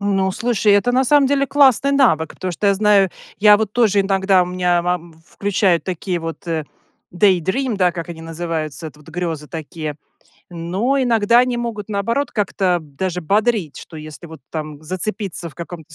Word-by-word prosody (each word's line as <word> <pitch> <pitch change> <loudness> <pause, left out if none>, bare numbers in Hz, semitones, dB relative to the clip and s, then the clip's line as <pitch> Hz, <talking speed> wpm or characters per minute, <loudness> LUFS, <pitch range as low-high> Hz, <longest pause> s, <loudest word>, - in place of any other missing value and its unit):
Ну, 195 -2 0
слушай, 225 -3 +1
это 225 +5 +3
на 260 +1 +3
самом 285 +1 +4
деле 280 0 +1
классный 275 -1 +4
навык, 220 - +3
потому 185 -1 -4
что 205 - -2
я 200 - +4
знаю, 200 -2 +4 0.3
я 210 0 +7
вот 215 -2 -2
тоже 215 -4 +3
иногда 195 -1 +3
у - - -3
меня 180 -1 +1
мам 175 -1 -2
включаю 195 -3 +1
такие 180 0 -3
вот, 165 +3 -7
э, 160 -2 -2 0.5
daydream, 200 - +2
да, 180 -2 +2
как 170 -1 -6
они 165 -1 -8
называются, 165 -1 -4
это 150 0 -12
вот 150 - -18
грёзы 165 -3 -4
такие. 155 -1 -6 0.5
Но 185 +11 -1
иногда 235 -2 +3
они 250 -1 +2
могут, 225 -3 -4
наоборот, 230 +7 -1
как-то 190 -3 0
даже 175 +5 -4
бодрить, 205 - 0
что 160 - -11
если 155 +2 -10
вот 160 -3 -12
там 155 -1 -6
зацепиться 185 0 -4
в 140 - -16
каком-то 165 -2 -9
185 Hz, 175 wpm, -19 LUFS, 165-215 Hz, 0.5 s, я